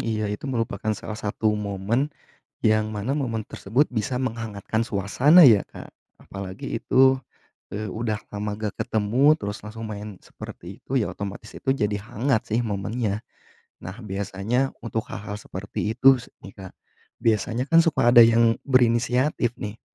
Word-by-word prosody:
iya, 110 Hz, -1 st, -1 dB
itu 105 Hz, +6 st, -6 dB
merupakan 115 Hz, -4 st, -2 dB
salah 110 Hz, -, -7 dB
satu 110 Hz, 0 st, -1 dB
momen, 105 Hz, +6 st, -1 dB, 0.5 s
yang 110 Hz, 0 st, +2 dB
mana 110 Hz, +7 st, -2 dB
momen 115 Hz, -7 st, -3 dB
tersebut 125 Hz, +9 st, 0 dB
bisa 125 Hz, +2 st, -2 dB
menghangatkan 115 Hz, -2 st, -2 dB
suasana 120 Hz, -, +4 dB
ya, 105 Hz, -4 st, +5 dB
Kak. -, -, -10 dB, 0.3 s
Apalagi 100 Hz, +1 st, -6 dB
itu, 130 Hz, +3 st, +4 dB, 0.6 s
eee, 105 Hz, -1 st, -4 dB
udah 110 Hz, 0 st, -2 dB, 0.2 s
lama 105 Hz, 0 st, -3 dB
nggak 105 Hz, -1 st, -5 dB
ketemu, 115 Hz, +6 st, +3 dB
terus 105 Hz, -7 st, -5 dB
langsung 110 Hz, +1 st, -9 dB
main 105 Hz, -1 st, -7 dB
seperti 90 Hz, +4 st, -10 dB
itu, 135 Hz, -, -5 dB
ya 120 Hz, -5 st, +1 dB
otomatis 100 Hz, +1 st, -7 dB
itu, -, -, -5 dB
jadi 105 Hz, -5 st, 0 dB, 0.2 s
hangat 120 Hz, 0 st, 0 dB
sih 120 Hz, -, +1 dB
momennya. 105 Hz, 0 st, -2 dB, 0.6 s
Nah, 95 Hz, +3 st, -8 dB
biasanya 100 Hz, +6 st, -1 dB, 0.2 s
untuk 115 Hz, -1 st, -1 dB
hal-hal 105 Hz, 0 st, -6 dB
seperti 100 Hz, +3 st, -4 dB
itu 135 Hz, -2 st, +6 dB
s -, -, -14 dB, 0.2 s
nih, 95 Hz, -, -10 dB
Kak, 95 Hz, -, -10 dB, 0.4 s
biasanya 115 Hz, +2 st, 0 dB
kan 165 Hz, +4 st, +6 dB
suka 135 Hz, -7 st, +3 dB
ada 120 Hz, -, +10 dB
yang 115 Hz, 0 st, +5 dB, 0.2 s
berinisiatif 125 Hz, 0 st, +2 dB
nih, 105 Hz, +1 st, -7 dB
110 Hz, 150 wpm, -24 LUFS, 105-125 Hz, 0.6 s, ada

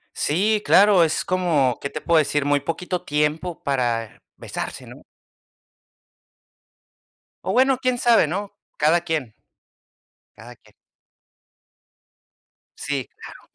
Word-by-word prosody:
Sí, 205 Hz, +7 st, +1 dB
claro, 195 Hz, -3 st, +6 dB
es 160 Hz, -, -1 dB
como, 160 Hz, -9 st, +1 dB
¿qué 140 Hz, -, -4 dB
te 150 Hz, -, -7 dB
puedo 170 Hz, -1 st, +2 dB
decir?, 145 Hz, -1 st, 0 dB
muy 145 Hz, 0 st, +2 dB
poquito 175 Hz, +5 st, -4 dB
tiempo 150 Hz, +4 st, -2 dB
para 120 Hz, -5 st, -2 dB
besarse, -, -, -7 dB
¿no? -, -, -13 dB, 2.4 s
O 190 Hz, -, -1 dB
bueno, 260 Hz, +1 st, +3 dB
quién 255 Hz, -1 st, 0 dB
sabe, 235 Hz, -8 st, +4 dB
¿no?, 195 Hz, +5 st, -4 dB, 0.3 s
cada 160 Hz, +3 st, +3 dB
quien. 155 Hz, -10 st, -3 dB, 1.0 s
Cada 120 Hz, +4 st, -13 dB
quien. -, -, -25 dB, 2.1 s
Sí, 140 Hz, -3 st, -4 dB
claro. -, -, -12 dB
160 Hz, 110 wpm, -22 LUFS, 140-185 Hz, 2.4 s, claro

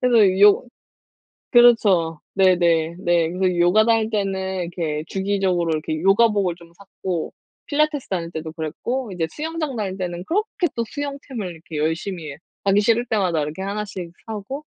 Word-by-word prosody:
그래서 215 Hz, -6 st, +4 dB
요 205 Hz, +3 st, +6 dB, 0.9 s
그렇죠. 205 Hz, -, +5 dB
네네. 170 Hz, -3 st, +3 dB
네. 175 Hz, -3 st, +1 dB
그래서 180 Hz, 0 st, 0 dB
요가 175 Hz, +5 st, +5 dB
다닐 225 Hz, -1 st, +3 dB
때는 190 Hz, -3 st, -2 dB
이렇게 165 Hz, -3 st, -3 dB
주기적으로 190 Hz, -3 st, 0 dB
이렇게 155 Hz, 0 st, -2 dB
요가복을 200 Hz, -2 st, +3 dB
좀 170 Hz, -1 st, -17 dB
샀고 185 Hz, -3 st, -5 dB, 0.3 s
필라테스 300 Hz, -1 st, 0 dB
다닐 170 Hz, -3 st, -3 dB
때도 160 Hz, -1 st, -5 dB
그랬고 200 Hz, -, -4 dB
이제 170 Hz, -3 st, -1 dB
수영장 310 Hz, -, -4 dB
다닐 195 Hz, -4 st, -3 dB
때는 175 Hz, -1 st, -4 dB
그렇게 405 Hz, -, 0 dB
또 235 Hz, -, -1 dB
수영템을 280 Hz, -6 st, -5 dB
이렇게 160 Hz, -1 st, -10 dB
열심히 160 Hz, 0 st, -3 dB, 0.3 s
하기 200 Hz, +1 st, +4 dB
싫을 230 Hz, +3 st, +2 dB
때마다 185 Hz, -8 st, +1 dB
이렇게 150 Hz, +4 st, -5 dB
하나씩 195 Hz, -3 st, -4 dB, 0.2 s
사고 225 Hz, +7 st, -6 dB
190 Hz, 350 characters per minute, -22 LUFS, 170-225 Hz, 0.9 s, 요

